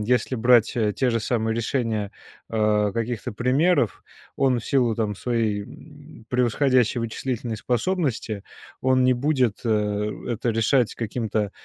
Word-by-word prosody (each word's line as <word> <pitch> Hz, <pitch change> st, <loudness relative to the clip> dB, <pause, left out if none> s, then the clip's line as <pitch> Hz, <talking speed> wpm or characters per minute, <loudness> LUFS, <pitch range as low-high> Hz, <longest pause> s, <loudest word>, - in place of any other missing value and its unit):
если 125 Hz, +3 st, +1 dB
брать 120 Hz, 0 st, +4 dB, 0.2 s
те 130 Hz, -2 st, +1 dB
же 115 Hz, -, 0 dB
самые 110 Hz, 0 st, -1 dB
решения, 115 Hz, -4 st, -1 dB, 0.4 s
а, 105 Hz, -2 st, +2 dB
каких-то 115 Hz, 0 st, -3 dB
примеров. 125 Hz, -, +1 dB, 0.3 s
Он 130 Hz, -3 st, +2 dB
в -, -, -12 dB
силу 125 Hz, -5 st, +2 dB
там 105 Hz, -2 st, -1 dB
своей, 110 Hz, -4 st, -1 dB
м, 145 Hz, +1 st, -14 dB
превосходящей 125 Hz, 0 st, +2 dB
вычислительной 115 Hz, 0 st, -3 dB
способности 120 Hz, -, -1 dB, 0.4 s
он 130 Hz, 0 st, +3 dB
не 130 Hz, 0 st, +4 dB
будет, 130 Hz, -5 st, +1 dB
э, 105 Hz, -1 st, 0 dB, 0.2 s
это 120 Hz, 0 st, -1 dB
решать 115 Hz, +2 st, +2 dB
каким-то 110 Hz, -2 st, -2 dB
115 Hz, 130 wpm, -24 LUFS, 110-125 Hz, 0.4 s, брать